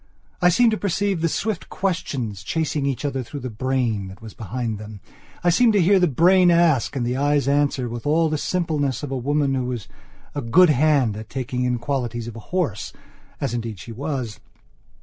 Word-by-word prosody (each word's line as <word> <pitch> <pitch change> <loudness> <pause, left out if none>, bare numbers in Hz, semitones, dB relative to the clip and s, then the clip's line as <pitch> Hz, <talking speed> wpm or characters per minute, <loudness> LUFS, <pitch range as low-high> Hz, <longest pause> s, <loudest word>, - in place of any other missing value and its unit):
I 180 - +6
seemed 230 +6 +4
to 215 - 0
perceive 200 -2 0
the 165 - +2
swift 210 +2 -2
questions 135 - -2
chasing 150 +5 -1
each 140 +1 -2
other 135 -2 -1
through 140 +3 -7
the 125 -1 -5
brain 115 -4 -1
that 95 0 -11
was 110 -1 -10
behind 115 0 -4
them. 105 -1 -9 0.4
I 175 - +4
seemed 230 +5 +4
to 205 - +4
hear 190 +2 +5
the 180 - +4
brain 180 +5 +5
ask 170 -7 +3
and 125 -3 -1
the 125 +1 -1
eyes 145 0 +2
answer 140 -3 +1
with 120 +3 -5
all 160 +2 +3
the 155 -1 -1
simpleness 150 -8 -1
of 145 - -4
a - - -1
woman 140 +2 0
who 130 -2 -1
was 125 -5 -4 0.5
a 145 - -3
good 155 +8 +5
hand 140 -6 +3
at 110 - -8
taking 125 -1 -2
in 125 -1 +1
qualities 120 -2 -3
of 120 - -7
a - - -7
horseas 160 - -4
indeed 115 -3 -4
she 115 - -9
was. 130 -3 -4
135 Hz, 200 wpm, -22 LUFS, 120-165 Hz, 0.5 s, I